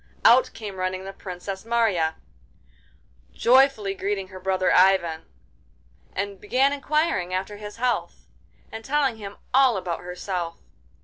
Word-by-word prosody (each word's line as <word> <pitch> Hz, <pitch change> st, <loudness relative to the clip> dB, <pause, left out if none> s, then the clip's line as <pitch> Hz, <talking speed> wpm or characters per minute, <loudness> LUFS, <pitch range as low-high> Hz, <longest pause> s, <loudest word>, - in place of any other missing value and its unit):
Out 245 Hz, +2 st, +6 dB
came 205 Hz, -4 st, -7 dB
running 185 Hz, 0 st, -2 dB
the 195 Hz, 0 st, -7 dB
Princess 190 Hz, 0 st, -7 dB
Marya, 220 Hz, -9 st, +1 dB, 1.2 s
joyfully 255 Hz, -5 st, +4 dB
greeted 195 Hz, -1 st, -3 dB
her 185 Hz, -1 st, -10 dB
brother 185 Hz, 0 st, +1 dB
Ivan, 180 Hz, -4 st, +3 dB, 0.9 s
and 200 Hz, 0 st, -4 dB
began 265 Hz, +6 st, +2 dB
inquiring 285 Hz, -, 0 dB
after 190 Hz, +2 st, -4 dB
his 210 Hz, 0 st, -8 dB
health, 245 Hz, +1 st, -2 dB, 0.5 s
and 225 Hz, -, -7 dB
telling 270 Hz, -2 st, +1 dB
him 200 Hz, -2 st, -9 dB, 0.2 s
all 260 Hz, -4 st, +5 dB
about 180 Hz, -3 st, -3 dB
herself. 180 Hz, -1 st, -4 dB
200 Hz, 125 wpm, -24 LUFS, 185-235 Hz, 1.2 s, Out